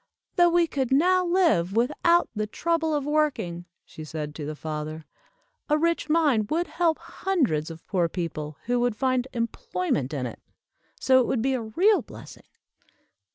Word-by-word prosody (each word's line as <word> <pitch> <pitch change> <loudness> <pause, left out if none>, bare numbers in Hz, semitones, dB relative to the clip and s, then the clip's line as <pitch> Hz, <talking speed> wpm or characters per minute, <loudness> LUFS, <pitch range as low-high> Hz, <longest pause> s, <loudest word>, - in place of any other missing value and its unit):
"Though 350 -1 +5
we 345 0 +3
could 270 -6 -2
now 365 +7 +4
live 335 - +2
without 340 +9 +3
the 215 0 -2
trouble 325 +5 0
of 290 -2 -1
working," 285 - -1 0.2
she 155 - -10
said 150 -1 -5
to 150 -1 -6
the 155 - -4
father, 155 +1 -5 0.6
"a 300 - +4
rich 335 0 0
mine 290 -10 +3
would 335 +3 0
help 335 -3 0
hundreds 250 - -1
of 165 0 -10
poor 175 -4 0
people, 155 -4 -5
who 245 +1 +1
would 245 -2 +1
find 255 +2 0
employment 180 - -2
in 135 -4 -3
it. 120 - -7 0.6
So 260 -1 +5
it 250 - +1
would 230 -3 0
be 265 +1 +1
a 255 - -1
real 355 - +3
blessing." - - -13
245 Hz, 165 wpm, -26 LUFS, -, 0.6 s, Though